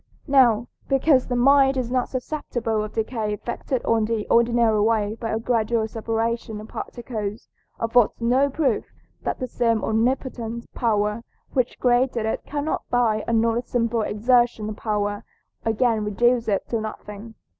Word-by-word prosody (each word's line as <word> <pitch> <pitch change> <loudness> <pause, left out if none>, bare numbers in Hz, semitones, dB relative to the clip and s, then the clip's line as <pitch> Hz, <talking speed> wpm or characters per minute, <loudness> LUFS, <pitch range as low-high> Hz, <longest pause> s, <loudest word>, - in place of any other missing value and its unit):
Now 250 -5 +4 0.2
because 270 -1 +3
the 245 - -1
mind 270 +2 +5
is 245 -2 -2
not 255 -1 0
susceptible 240 -5 -2
of 215 - -7
decay 220 -2 -2
effected 240 +3 -4
in 225 -1 +3
the 220 -1 -2
ordinary 235 -2 +3
way 215 -1 +1
by 225 0 -5
a 220 - 0
gradual 225 -1 0
separation 225 0 -2
of 215 - -9
particles, 220 -3 -5 0.3
affords 230 0 +2
no 255 +4 +3
proof 285 +1 0 0.4
that - - -2
that 255 -1 -5
same 230 -2 +1
omnipotent 235 0 -1
power 210 -1 0 0.3
which 255 -2 0
created 245 -2 +2
it 220 - -2
cannot 295 +2 -2
by 230 -3 +2
another 230 0 +2
simple 235 -2 0
exertion 230 0 +2
of 215 - -5
power 205 -1 -2 0.4
again 225 0 +1
reduce 235 +3 +2
it 200 -2 0
to 230 -2 -1
nothing. 215 0 -8
230 Hz, 145 wpm, -23 LUFS, 220-245 Hz, 0.4 s, mind